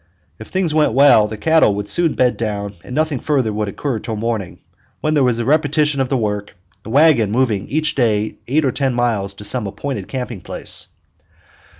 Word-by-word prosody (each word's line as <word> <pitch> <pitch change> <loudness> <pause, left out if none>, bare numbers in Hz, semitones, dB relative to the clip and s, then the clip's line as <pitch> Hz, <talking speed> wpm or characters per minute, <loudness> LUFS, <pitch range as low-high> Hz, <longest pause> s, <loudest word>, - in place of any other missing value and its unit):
If 110 - -9
things 185 -4 -1
went 155 -6 +2
well, 135 -5 +6
the 110 0 -7
cattle 160 -4 +3
would 105 0 -4
soon 170 +5 +2
bed 125 -1 +2
down 100 -3 -3
and 125 - -8
nothing 155 -3 0
further 130 -8 0
would 105 0 -2
occur 125 +4 -3
until 110 +1 -5
morning, 110 -4 -3 0.4
when 155 - 0
there 145 -3 +3
was 125 -2 +2
a 120 - -2
repetition 150 0 +2
of 130 - -1
the 135 - +1
work, 105 -3 -3 0.3
the - - -10
wagon 135 -4 +4
moving 110 -4 0
each 155 +1 0
day 110 -4 0
eight 145 +4 +1
or 130 - +2
ten 135 -1 -1
miles 110 -5 -1
to 105 - -10
some 105 0 -2
appointed 135 +7 -5
camping 125 -6 -5
place. - - -1
125 Hz, 200 wpm, -18 LUFS, 105-145 Hz, 0.4 s, well